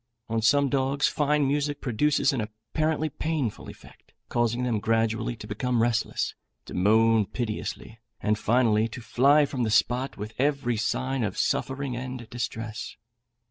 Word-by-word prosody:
On 115 0 0
some 140 +5 +4
dogs 135 +1 +1
fine 150 -1 +1
music 145 +1 0
produces 145 +5 +1
an 125 - -1
apparently 145 +9 -2
painful 150 -5 -3
effect, - - -16 0.2
causing 120 +1 0
them 120 -4 0
gradually 115 +2 0
to 105 - -10
become 120 +3 -1
restless, 120 -1 0 0.3
to - - -9
moan 110 +2 +4
piteously, 110 -1 -5 0.2
and, 105 - +1
finally, 115 -2 +3
to 115 - -8
fly 140 +6 +4
from 135 -2 -4
the 115 - +1
spot 125 +5 +1
with 105 +2 -6
every 140 -3 +1
sign 130 +3 -1
of 105 -3 -3
suffering 140 -1 -1
and 125 -1 -6
distress. 115 -2 -5
120 Hz, 145 wpm, -26 LUFS, 110-140 Hz, 0.3 s, some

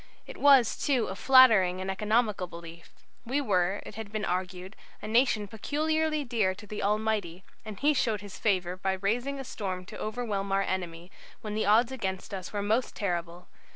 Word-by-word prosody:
It - - -10
was, 275 -5 +5
too, 260 -5 +1
a 190 - -5
flattering 215 -8 +6
and 190 +1 -3
economical 210 -1 0
belief. 170 0 -11 0.3
We 255 +4 -1
were, 195 -6 0
it - - -9
has 220 0 -7
been 215 +1 -3
argued, 185 +2 -4 0.2
a - - -7
nation 220 -2 +2
peculiarly 310 +7 -1
dear 220 -7 0
to 210 - -12
the 210 0 -6
Almighty, 205 -4 -1 0.2
and 215 -3 -8
He 295 +2 +3
showed 225 -7 0
His 205 -2 -10
favour 185 -4 0
by 190 +1 -1
raising 240 +9 -2
a - - -4
storm 185 -7 -5
to - - -10
overwhelm 215 -3 -3
our 195 0 +2
enemy, 175 -2 -4 0.3
when 210 -1 -5
the 215 -1 -1
odds 230 +4 +4
against 195 -7 -4
us 185 -2 -6
were 205 -1 -3
most 220 +5 0
terrible. 175 -2 -3
205 Hz, 185 wpm, -28 LUFS, 185-235 Hz, 0.3 s, flattering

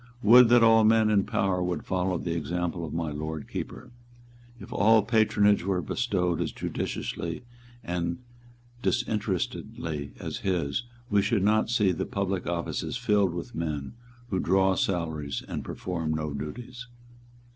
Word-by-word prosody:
"Would 120 +2 +8
that 120 -1 +6
all 115 0 +6
men 110 0 +4
in 100 -2 +3
power 95 -2 0
would 90 -3 -2
follow 90 -1 0
the 85 0 -3
example 85 +2 -2
of 80 - -5
my 80 -2 -2
Lord 80 +1 -5
Keeper! - - -6 0.7
If - - -9
all 110 +1 +5
patronage 105 -2 +3
were 95 -1 0
bestowed 90 -4 0
as - - -1
judiciously 85 +6 -4 0.4
and 85 -1 -2 0.6
disinterestedly 95 - -2
as - - -4
his, 90 - -1 0.3
we 100 -1 +4
should 100 -1 +1
not 110 +2 +3
see 105 -5 +3
the 85 - -3
public 95 -2 -2
offices 85 +7 -2
filled 105 -7 +2
with 90 +8 -6
men 75 -6 -3 0.4
who 95 - +1
draw 95 +1 +3
salaries 80 -7 -2
and - - -4
perform 80 -4 -3
no 75 -2 -3
duties." 120 - -7
95 Hz, 145 wpm, -27 LUFS, 85-110 Hz, 0.7 s, Would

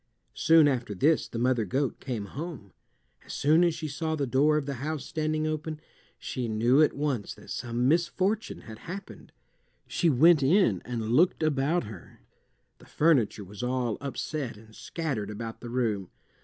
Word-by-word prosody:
Soon 160 -2 +5
after 125 -7 -1
this 150 - +2
the - - -7
mother 120 -1 +2
goat 130 +7 -1
came 120 -6 -4
home. 135 - -7 0.5
As - - -9
soon 155 +4 +4
as 170 -2 +2
she 155 -1 -4
saw 160 +2 -2
the 145 -2 -1
door 145 +5 +3
of 150 - -1
the 140 - -3
house 155 0 -3
standing 155 -1 -1
open, 155 0 -3 0.4
she 125 -3 -4
knew 120 +6 +3
at 155 - +4
once 140 -8 -2
that - - -13
some 120 +1 -1
misfortune 185 +7 0
had 110 -1 -11
happened. 195 +4 -9 0.5
She 170 - +1
went 155 +3 +6
in 135 - +3
and 115 -3 -3
looked 165 +6 +3
about 155 +3 +1
her. 105 -4 -11 0.6
The - - -17
furniture 135 -10 +2
was 100 +2 -9
all 125 -2 -1
upset 140 -3 -4
and 110 +1 -16
scattered 135 -8 -4
about 110 +2 -6
the 120 - -7
room. 110 -7 -1
140 Hz, 170 wpm, -28 LUFS, 115-155 Hz, 0.6 s, went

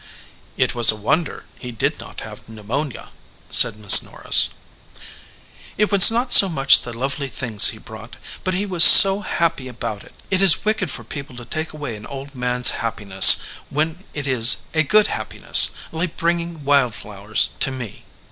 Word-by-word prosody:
"It - - -3
was 120 -2 +3
a - - -8
wonder 140 +10 -5
he 125 - -11
did 115 - -5
not - - -13
have - - -15
pneumonia," 115 +6 -9 0.4
said 115 -4 +3
Miss 105 -3 +8
Norris. - - 0 1.3
"It 210 +1 -2
was 200 -2 +6
not 240 +3 -4
so 195 - +7
much 135 -5 +2
the 120 - -11
lovely 135 +4 -7
things 115 -6 +1
he 110 - -7
brought, 110 +1 -15 0.3
but 185 -1 -5
he 195 +3 -5
was 180 -4 +3
so 195 0 +9
happy 165 -8 -5
about 115 -4 -9
it. - - -22 0.2
It 190 0 -1
is 190 -2 +3
wicked 215 -5 -4
for 120 - -10
people 135 +2 -12
to 120 -1 -13
take 155 +6 -7
away 145 -7 -10
an 105 0 -14
old 140 +1 -12
man 125 -1 -6
s 125 - +5
happiness 105 -4 +2 0.3
when 160 +5 -6
it 145 -2 -8
is 125 -3 +1
a 160 - -1
good 210 +8 0
happiness, - - +1 0.2
like 165 +1 -7
bringing 170 -2 -5
wild 140 -5 -1
flowers 105 +1 -6
to - - -2
me." 125 -5 -11
135 Hz, 175 wpm, -17 LUFS, 115-170 Hz, 1.3 s, so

